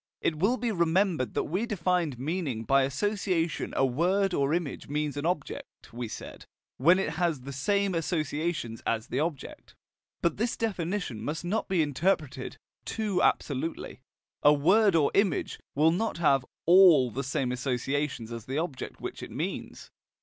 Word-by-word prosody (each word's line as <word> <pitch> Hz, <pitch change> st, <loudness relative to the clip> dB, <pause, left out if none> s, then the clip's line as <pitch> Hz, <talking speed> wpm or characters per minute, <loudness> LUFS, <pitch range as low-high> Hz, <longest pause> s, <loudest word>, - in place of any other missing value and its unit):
It 155 Hz, -2 st, -1 dB
will 220 Hz, +9 st, +2 dB
be 235 Hz, -1 st, -1 dB
remembered 170 Hz, -, +1 dB
that -, -, +1 dB
we 190 Hz, +9 st, -2 dB
defined 180 Hz, -, 0 dB
meaning 140 Hz, -4 st, -2 dB
by 135 Hz, +5 st, +4 dB
association 180 Hz, +1 st, -1 dB
a 135 Hz, -, +4 dB
word 180 Hz, +9 st, +1 dB
or 140 Hz, -2 st, +1 dB
image 165 Hz, -4 st, -2 dB
means 150 Hz, 0 st, -2 dB
an 145 Hz, +3 st, -2 dB
object, 175 Hz, -9 st, -5 dB
we 120 Hz, 0 st, -4 dB
said, -, -, -9 dB, 0.3 s
when 170 Hz, +8 st, +5 dB
it 190 Hz, -5 st, -1 dB
has 165 Hz, -6 st, +1 dB
the 140 Hz, +2 st, -7 dB
same 200 Hz, +8 st, +1 dB
associations 155 Hz, -6 st, -2 dB
as 115 Hz, +1 st, -1 dB
the 130 Hz, -, -1 dB
object. 155 Hz, -2 st, -4 dB, 0.5 s
But 170 Hz, -, +1 dB
this 230 Hz, +3 st, -1 dB
definition 180 Hz, -, -2 dB
must 155 Hz, +6 st, -3 dB
not 210 Hz, +6 st, -1 dB
be 185 Hz, -5 st, +2 dB
interpreted 150 Hz, -3 st, -1 dB, 0.3 s
too 210 Hz, -4 st, -1 dB
absolutely: 140 Hz, 0 st, -1 dB, 0.4 s
a 145 Hz, -, +7 dB
word 190 Hz, +7 st, +4 dB
or 150 Hz, -3 st, +3 dB
image 195 Hz, -7 st, +1 dB, 0.2 s
will 155 Hz, +3 st, +4 dB
not 215 Hz, +4 st, -1 dB
have 140 Hz, -6 st, +3 dB, 0.2 s
ALL 170 Hz, -8 st, +7 dB
the 135 Hz, +5 st, -3 dB
same 130 Hz, -1 st, -1 dB
associations 130 Hz, -1 st, -2 dB
as 115 Hz, -2 st, -6 dB
the 135 Hz, +2 st, -3 dB
object 160 Hz, -4 st, -4 dB
which -, -, -6 dB
it -, -, -7 dB
means. -, -, -5 dB
160 Hz, 160 wpm, -28 LUFS, 135-185 Hz, 0.5 s, a